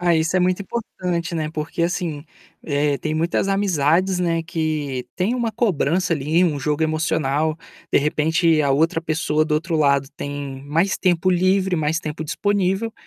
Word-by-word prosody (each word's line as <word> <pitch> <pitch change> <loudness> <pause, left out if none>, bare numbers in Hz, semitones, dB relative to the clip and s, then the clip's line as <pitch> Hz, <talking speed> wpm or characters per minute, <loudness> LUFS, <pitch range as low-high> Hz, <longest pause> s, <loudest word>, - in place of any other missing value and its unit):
Ah, 175 -1 +3
isso 160 +3 +1
é - - +3
muito 185 +2 +1
importante, 180 -6 -3
né, 155 -1 -2
porque 160 +2 -3
assim, 170 -3 -2 0.4
eh, 145 -1 0
tem 155 0 -3
muitas 170 +4 0
amizades, 185 -1 +2
né, 165 -2 0
que 155 -6 -2
tem 195 +7 0
uma 235 -2 -1
cobrança 180 - +1
ali, 160 +4 +2
um 150 -5 0
jogo 150 +2 0
emocional, 155 -1 0 0.3
de - - +5
repente 155 +2 +2
a 140 - +1
outra 160 +4 +2
pessoa 155 -1 0
do 155 - 0
outro 165 +2 -1
lado 140 -2 +3
tem 140 -2 -5
mais 165 +7 +1
tempo 180 -1 +1
livre, 185 +1 +2
mais 155 0 0
tempo 155 -1 -5
disponível, 200 +5 0
160 Hz, 165 wpm, -21 LUFS, 150-180 Hz, 0.4 s, de